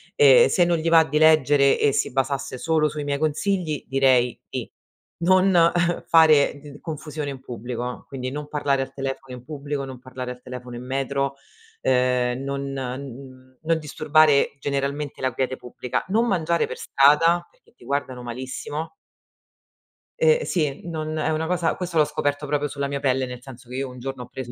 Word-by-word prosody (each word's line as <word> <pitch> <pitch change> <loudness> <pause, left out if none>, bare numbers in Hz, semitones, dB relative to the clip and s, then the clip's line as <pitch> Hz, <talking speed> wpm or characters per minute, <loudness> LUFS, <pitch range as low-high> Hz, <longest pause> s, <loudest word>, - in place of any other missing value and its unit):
E 475 +1 +7
se 175 -2 +3
non 170 -1 +2
gli 165 +1 -1
va 165 -1 +7
di 150 0 -1
leggere 145 -3 +5
e 145 - +3
si - - 0
basasse 135 0 -2
solo 155 +1 +1
sui 150 0 -5
miei 140 0 -2
consigli, 155 +1 -1
direi 130 -3 +3
di, - - -4 0.5
non 185 -1 +5 0.4
fare 155 -3 +5
d 145 0 -12
confusione 155 -2 -5
in 135 - -6
pubblico, 125 -1 -6
quindi 130 -1 -5
non 150 +1 -5
parlare 140 -2 0
al 135 0 -5
telefono 135 -1 -5
in 125 - -13
pubblico, 145 -2 -4
non 130 -2 -9
parlare 125 0 -7
al 125 - -10
telefono 125 -1 -8
in 120 - -7
metro, 135 +1 -1 0.5
ehm, 125 -1 +1
non 140 0 -3
n 130 0 -7
non 165 +1 +1
disturbare 155 -1 +3
generalmente 140 +1 -3
la 130 -1 0
quiete 130 0 -1
pubblica, 125 0 -4
non 225 +5 +2
mangiare 170 -6 +1
per - - -7
strada 165 +5 +4
perché - - -29
ti - - -18
guardano 135 -3 -3
malissimo. 130 +6 -5 1.3
Eh 480 0 +4
sì, 150 -5 -1
non 155 -2 -4
è 155 - 0
una 160 +1 -1
cosa 175 -1 0
questo 175 -2 -3
l'ho 155 - +6
scoperto 145 0 -2
proprio 145 0 0
sulla 140 -1 -3
mia 140 0 -2
pelle, 130 -1 +1
nel 125 -1 -8
senso 125 -1 -13
che 125 - -7
io 135 0 -2
un 125 0 -11
giorno 130 0 -5
ho - - -12
preso 125 -1 -7
140 Hz, 180 wpm, -23 LUFS, 130-155 Hz, 1.3 s, E